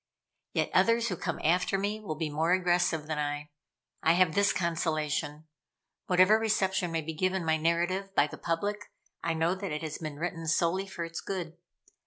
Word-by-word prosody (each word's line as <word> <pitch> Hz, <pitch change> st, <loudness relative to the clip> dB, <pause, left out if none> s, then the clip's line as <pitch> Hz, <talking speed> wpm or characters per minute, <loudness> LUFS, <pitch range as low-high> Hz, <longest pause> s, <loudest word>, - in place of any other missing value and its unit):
Yet -, -, 0 dB
others 230 Hz, 0 st, +3 dB
who 180 Hz, -, -2 dB
come -, -, -3 dB
after 180 Hz, +4 st, +2 dB
me 205 Hz, +2 st, -1 dB
will 195 Hz, -8 st, -5 dB
be 155 Hz, -1 st, -3 dB
more 160 Hz, +4 st, +2 dB
aggressive 175 Hz, -4 st, +2 dB
than 155 Hz, -1 st, -3 dB
I. 145 Hz, 0 st, -3 dB, 0.5 s
I 160 Hz, -, +4 dB
have 180 Hz, -2 st, +3 dB
this 200 Hz, 0 st, +3 dB
consolation: 155 Hz, -3 st, -1 dB, 0.6 s
whatever 185 Hz, +4 st, +5 dB
reception 190 Hz, -5 st, +1 dB
may 165 Hz, -1 st, 0 dB
be 160 Hz, +1 st, -5 dB
given 185 Hz, +2 st, 0 dB
my 160 Hz, 0 st, +2 dB
narrative 175 Hz, +5 st, 0 dB
by 145 Hz, -, +5 dB
the 150 Hz, +1 st, -9 dB
public, 205 Hz, +5 st, -2 dB, 0.3 s
I 165 Hz, 0 st, 0 dB
know 165 Hz, +2 st, +2 dB
that 190 Hz, -2 st, -5 dB
it 150 Hz, +1 st, -3 dB
has 155 Hz, -1 st, -4 dB
been 155 Hz, -3 st, -6 dB
written 165 Hz, 0 st, -4 dB
solely 170 Hz, +4 st, +1 dB
for 175 Hz, -3 st, -5 dB
its 165 Hz, 0 st, -6 dB
good. 175 Hz, -4 st, -4 dB
170 Hz, 185 wpm, -29 LUFS, 160-190 Hz, 0.6 s, whatever